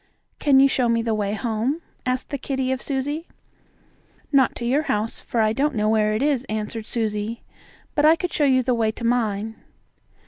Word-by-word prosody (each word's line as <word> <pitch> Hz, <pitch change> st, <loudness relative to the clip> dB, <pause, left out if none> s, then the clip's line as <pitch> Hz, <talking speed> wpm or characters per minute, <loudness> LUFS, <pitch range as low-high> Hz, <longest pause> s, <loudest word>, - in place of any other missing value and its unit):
"Can 275 Hz, -3 st, +5 dB
you 275 Hz, -, +7 dB
show 255 Hz, -3 st, +1 dB
me 230 Hz, 0 st, +2 dB
the 225 Hz, -1 st, 0 dB
way 205 Hz, -1 st, -1 dB
home?" 235 Hz, +9 st, -1 dB, 0.2 s
asked 255 Hz, 0 st, -1 dB
the 280 Hz, -, -3 dB
kittie 265 Hz, -1 st, -2 dB
of 260 Hz, -, -2 dB
Susie. 290 Hz, +4 st, -3 dB, 1.0 s
"Not 270 Hz, -3 st, +4 dB
to 235 Hz, -, -5 dB
your 265 Hz, +5 st, +2 dB
house, 210 Hz, +2 st, -1 dB
for 230 Hz, -, -1 dB
I 215 Hz, 0 st, +2 dB
don't 280 Hz, +3 st, 0 dB
know 215 Hz, 0 st, +1 dB
where 215 Hz, -1 st, +2 dB
it 225 Hz, -, 0 dB
is," 280 Hz, -4 st, +1 dB
answered 215 Hz, +1 st, -4 dB
Susie, 220 Hz, 0 st, -2 dB, 0.5 s
"but 295 Hz, -, +1 dB
I 315 Hz, +2 st, +7 dB
could 355 Hz, +1 st, -4 dB
show 300 Hz, -, +2 dB
you 260 Hz, -2 st, +4 dB
the 250 Hz, 0 st, +1 dB
way 225 Hz, -2 st, +1 dB
to 220 Hz, -, -6 dB
mine." 225 Hz, -2 st, 0 dB
240 Hz, 200 wpm, -23 LUFS, 220-275 Hz, 1.0 s, you